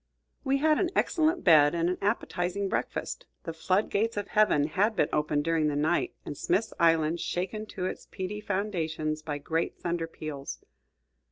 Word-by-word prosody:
We 275 -1 +2
had 305 +2 +3
an 365 - +1
excellent 330 +1 +2
bed 155 -3 +6
and 170 0 +1
an 180 - -1
appetizing 200 -2 -1
breakfast. - - -3 0.2
The 165 - -5
flood 185 +5 0
gates 225 +2 0
of 205 -1 -3
heaven 210 -9 +4
had 200 +9 +1
been 150 - +2
opened 150 -1 +1
during 165 -1 +1
the 150 - 0
night, 155 +4 +1
and 145 - -5
Smith's 195 +9 0
Island 165 0 +3
shaken 195 +6 -3
to 185 -3 -4
its - - -5
peaty 195 +3 -5
foundations 165 -7 -2
by 150 -2 -4
great 160 +3 -2
thunder 170 -1 -2
peals. 150 -4 -6
175 Hz, 170 wpm, -28 LUFS, 155-210 Hz, 0.2 s, bed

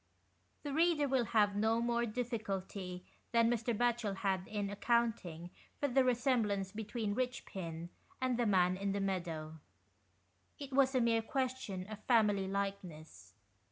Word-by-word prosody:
The 290 -2 -3
reader 320 -2 +3
will 260 -3 +2
have 210 -3 +3
no 220 +2 +2
more 235 0 +1
difficulty 200 -6 -4 0.3
than 230 0 +4
Mr. 235 -2 -1
Batchel 235 -3 0
66 - - -9
THE 200 - +3
EICHPINS. - - +5
had 190 -1 -3
in 205 -2 -2
accounting 205 -7 0 0.3
for 285 - +1
the 265 +1 +4
resemblance 235 -6 +1
between 215 0 -3
Eichpin 185 -9 -4 0.3
and 255 -1 +1
the 240 - +2
man 185 -2 +3
in 200 0 -1
the 200 - -1
meadow. 165 -5 -3 1.0
It 280 -2 -8
was 270 0 +4
a 255 - +4
mere 230 -1 +3
question 255 -7 -2
of 215 +1 -8
family 210 -5 +3
likeness. 180 - -5
215 Hz, 155 wpm, -35 LUFS, 190-245 Hz, 1.0 s, EICHPINS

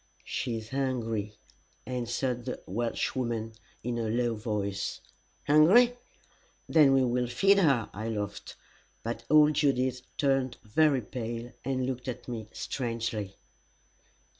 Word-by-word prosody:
"She 115 -2 -2
is 110 0 -8
hungry," 115 -6 -2 0.5
answered 125 0 -2
the 125 - -4
Welshwoman, 115 +1 -2 0.3
in 120 0 -2
a 115 -1 -1
low 120 +1 +1
voice. 105 -3 -3 0.5
"Hungry? 195 +12 +6 0.7
Then 150 -4 +6
we 135 -1 +4
will 125 0 +1
feed 195 +12 +4
her." 135 - +3
I 110 +3 -4
laughed. 105 -2 -4 0.5
But 115 0 -4
old 150 0 +6
Judith 130 -4 +1 0.2
turned 135 -3 +1
very 135 +5 +3
pale, 115 +1 -5
and 130 -1 -1
looked 125 -1 -4
at 125 - -5
me 115 -3 -5
strangely. 115 -5 -3
120 Hz, 120 wpm, -29 LUFS, 115-135 Hz, 0.7 s, Hungry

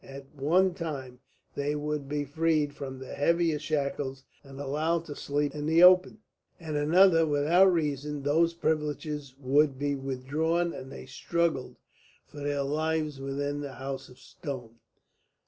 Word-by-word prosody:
At 135 +1 -11
one 175 +7 +3
time 135 -8 -6 0.3
they 145 +1 -1
would 150 -1 -3
be 145 0 -1
freed 155 0 +1
from 135 -2 -7
the 130 0 -8
heavier 165 +1 +2
shackles 140 -3 -2 0.2
and 135 -1 -12
allowed 155 +4 -1
to 145 - -7
sleep 145 0 -1
in 150 0 -4
the 165 +2 +5
open; 185 +3 +6 0.4
at 160 -3 -6
another, 165 +2 +5
without 160 +6 +4
reason, 150 -3 -2
those 165 +4 +2
privileges 150 -3 -2
would 140 +1 +2
be 145 +1 -1
withdrawn, 145 +6 -1
and 130 0 -8
they - - -9
struggled 160 +1 -1 0.5
for 145 - -12
their 145 -1 -1
lives 155 0 -1
within 145 +1 -3
the 140 -2 -6
House 135 0 -6
of 125 - -16
Stone. 130 -4 -8
145 Hz, 145 wpm, -28 LUFS, 135-160 Hz, 0.5 s, open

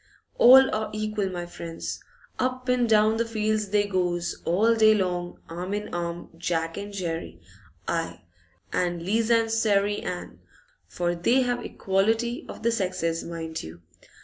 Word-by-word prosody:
All 265 +2 +8
are 215 0 -1
equal, 215 -2 -2
my 175 -1 -4
friends. 170 -1 -6 0.4
Up 255 0 -1
an' 250 -1 +2
down 215 0 +4
the 230 - +2
fields 215 -2 -1
they 205 0 +2
goes, 175 -3 -1
all 210 +7 +3
day 215 -1 +5
long, 180 -3 -2
arm 180 +4 -4
in 210 0 -5
arm, 170 0 -4
Jack 165 -1 -2
and 200 +1 -6
Jerry, 165 - -4 0.5
aye, - - -2 0.5
and 175 -1 0
Liza 225 +5 +2
an' 225 0 +1
Sairey 205 -2 +2
Ann; 175 - -6 0.5
for 175 0 -1
they 235 +10 +2
have 245 -1 -1
equality 225 +5 0
of - - -9
the 235 - +3
sexes, 185 -6 -1
mind 165 -1 -5
you! 85 +2 -11
200 Hz, 150 wpm, -26 LUFS, 175-225 Hz, 0.5 s, All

